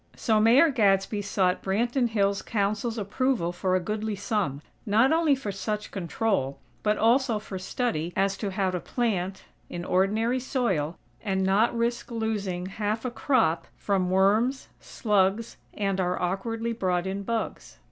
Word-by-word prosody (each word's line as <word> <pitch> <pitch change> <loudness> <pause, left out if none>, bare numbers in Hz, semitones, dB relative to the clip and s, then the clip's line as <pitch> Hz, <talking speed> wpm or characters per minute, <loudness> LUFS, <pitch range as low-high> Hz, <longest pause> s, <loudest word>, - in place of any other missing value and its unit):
So, 220 -2 +2
Mayor 250 +9 +6
Gadsby 205 -3 +2
sought 190 -2 0
Branton 235 +5 +1
Hills' 200 -2 +1
Council's 215 +2 -1
approval 210 -2 0
for 185 +1 0
a - - +3
goodly 215 +3 -3
sum; 200 - -2 0.2
not 225 +6 +3
only 320 -3 +3
for 240 -6 -4
such 210 +2 -4
control, 185 -6 -1 0.2
but 210 0 +1
also 235 +1 +3
for 200 -2 -6
study 185 -4 -2
as 195 0 +1
to 205 - -3
how 190 -1 0
to 180 - -2
plant, 195 -4 -2 0.3
in 175 0 -5
ordinary 215 +8 +1
soil, 195 - -1 0.2
and 190 -3 0
not 205 +5 +2
risk 235 +1 -1
losing 210 -6 -2
half 210 +4 -3
a 250 - -1
crop 235 - +1
from 190 -3 0
worms, 210 +8 +2
slugs 210 0 0 0.2
and 195 -2 0
our 180 0 -1
awkwardly 225 +6 -2
brought 180 -5 0
in 195 +1 -3
"bugs." 225 +2 -4
205 Hz, 150 wpm, -27 LUFS, 190-230 Hz, 0.3 s, Mayor